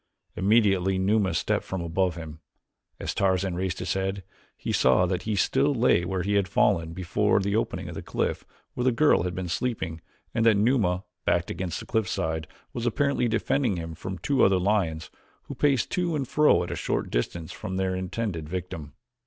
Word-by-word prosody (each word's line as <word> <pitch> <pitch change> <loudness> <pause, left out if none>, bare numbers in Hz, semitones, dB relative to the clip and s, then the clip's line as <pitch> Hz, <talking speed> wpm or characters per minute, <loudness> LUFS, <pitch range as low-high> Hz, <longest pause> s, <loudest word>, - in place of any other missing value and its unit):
Immediately 95 -2 +3
Numa 100 +1 +2
stepped 80 - 0
from 95 - -4
above 85 +1 0
him. 80 -2 -8 0.6
As - - -3
Tarzan 95 -1 +1
raised 90 +1 -2
his 90 -1 -2
head, 95 0 -2 0.3
he - - -4
saw 65 +8 +4
that 90 0 -1
he 105 - +1
still 135 +8 +2
lay 115 -8 +3
where 95 0 -2
he 100 +2 0
had 100 -2 +2
fallen 85 -1 +2
before 95 +4 +1
the 100 +1 -1
opening 110 - -1
of - - -6
the - - -6
cliff - - -2 0.3
where 125 - -2
the 130 - +4
girl 145 0 +4
had 90 0 -3
been 95 -1 -3
sleeping 85 -5 -2 0.3
and 115 - +1
that 110 -2 +5
Numa, 100 -5 +2 0.2
backed - - +1
against 90 0 -3
the - - -8
cliffside, 80 -8 -1 0.3
was 120 0 -2
apparently 140 +1 +1
defending 115 -1 +1
him 80 -1 -5
from 95 +4 -6
two 140 +8 +1
other 95 -1 +5
lions 90 -5 0 0.3
who - - -7
paced 140 -4 +1
to 175 -3 0
and 140 -4 -2
fro 150 -10 +4
a 85 - -4
short - - -2
distance 80 +7 -2
from 95 0 -5
their 95 0 0
intended 95 -3 -3
victim. 85 -4 -5
95 Hz, 185 wpm, -26 LUFS, 85-110 Hz, 0.6 s, that